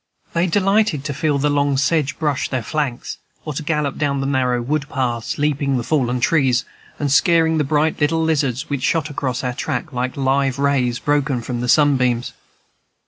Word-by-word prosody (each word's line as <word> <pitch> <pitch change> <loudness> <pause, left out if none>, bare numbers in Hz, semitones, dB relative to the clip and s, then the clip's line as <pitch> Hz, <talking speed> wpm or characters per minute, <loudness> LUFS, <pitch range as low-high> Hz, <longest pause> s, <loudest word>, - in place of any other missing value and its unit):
They 170 +2 +1
delighted 195 -4 +2
to 145 - -3
feel 145 +1 0
the 145 +1 +1
long 145 -1 +1
sedge 150 0 +1
brush 150 -5 -1
their 130 -3 -2
flanks, 135 -2 -3 0.3
or 155 - -4
to 140 - -4
gallop 150 -2 -1
down 140 -2 0
the 135 - -2
narrow 130 -3 +1
wood 140 +4 -2
paths, 120 -4 -2
leaping 140 -2 0
the 120 - -2
fallen 125 -3 0
trees, 130 -2 +2 0.3
and 145 -2 -1
scaring 160 +2 +3
the - - +2
bright 150 +2 0
little 160 +2 +2
lizards 140 -6 0
which 140 -3 -3
shot 155 +1 0
across 130 -3 -3
our 125 -1 -1
track 155 +5 -4
like 125 +2 -3
live 135 0 +1
rays 135 -4 +1
broken 145 -3 0
from 120 0 -4
the 125 - -2
sunbeams. 130 -4 +2
140 Hz, 185 wpm, -20 LUFS, 130-150 Hz, 0.3 s, scaring